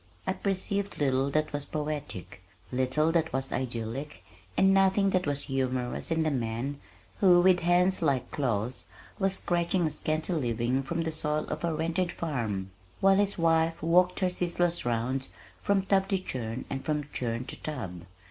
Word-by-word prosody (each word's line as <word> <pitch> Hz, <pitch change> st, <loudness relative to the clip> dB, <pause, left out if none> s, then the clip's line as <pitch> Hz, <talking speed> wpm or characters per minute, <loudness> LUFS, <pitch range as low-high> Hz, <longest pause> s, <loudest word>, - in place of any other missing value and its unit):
I -, -, +1 dB
perceived 200 Hz, +1 st, -2 dB
little 135 Hz, -1 st, +2 dB
that 155 Hz, +1 st, 0 dB
was 145 Hz, 0 st, -2 dB
poetic, 145 Hz, -, -5 dB, 0.3 s
little 130 Hz, +5 st, +1 dB
that 165 Hz, -1 st, +1 dB
was 135 Hz, +1 st, -1 dB
idyllic, 125 Hz, +1 st, -4 dB, 0.3 s
and 195 Hz, 0 st, +5 dB
nothing 195 Hz, +1 st, +4 dB
that 185 Hz, -3 st, +1 dB
was 145 Hz, -1 st, 0 dB
humorous 130 Hz, -2 st, -2 dB
in 160 Hz, -1 st, +1 dB
the 155 Hz, -, +1 dB
man, 125 Hz, +2 st, -2 dB, 0.4 s
who, 180 Hz, -3 st, +6 dB
with 180 Hz, 0 st, +5 dB
hands 180 Hz, +2 st, +3 dB
like 140 Hz, -6 st, +1 dB
claws, 125 Hz, -4 st, -1 dB, 0.3 s
was 195 Hz, -1 st, +3 dB
scratching 175 Hz, 0 st, +1 dB
a 155 Hz, -, 0 dB
scanty 155 Hz, +4 st, -1 dB
living 120 Hz, -3 st, 0 dB
from 165 Hz, +5 st, -2 dB
the 160 Hz, -, -2 dB
soil 155 Hz, -1 st, -1 dB
of -, -, -4 dB
a 170 Hz, -, +1 dB
rented 165 Hz, +3 st, -1 dB
farm, 110 Hz, -, -3 dB, 0.3 s
while 195 Hz, 0 st, +5 dB
his 200 Hz, 0 st, +2 dB
wife 165 Hz, -1 st, +2 dB
walked 180 Hz, +3 st, +3 dB
her 185 Hz, -, +3 dB
ceaseless 175 Hz, -2 st, 0 dB
round 120 Hz, +3 st, -1 dB, 0.3 s
from 200 Hz, -1 st, +2 dB
tub 195 Hz, 0 st, +2 dB
to 195 Hz, -, +1 dB
churn 125 Hz, -9 st, -4 dB
and 135 Hz, 0 st, -4 dB
from 150 Hz, -1 st, -1 dB
churn 120 Hz, 0 st, -2 dB
to -, -, -7 dB
tub. 110 Hz, -, -5 dB
155 Hz, 165 wpm, -29 LUFS, 130-175 Hz, 0.4 s, who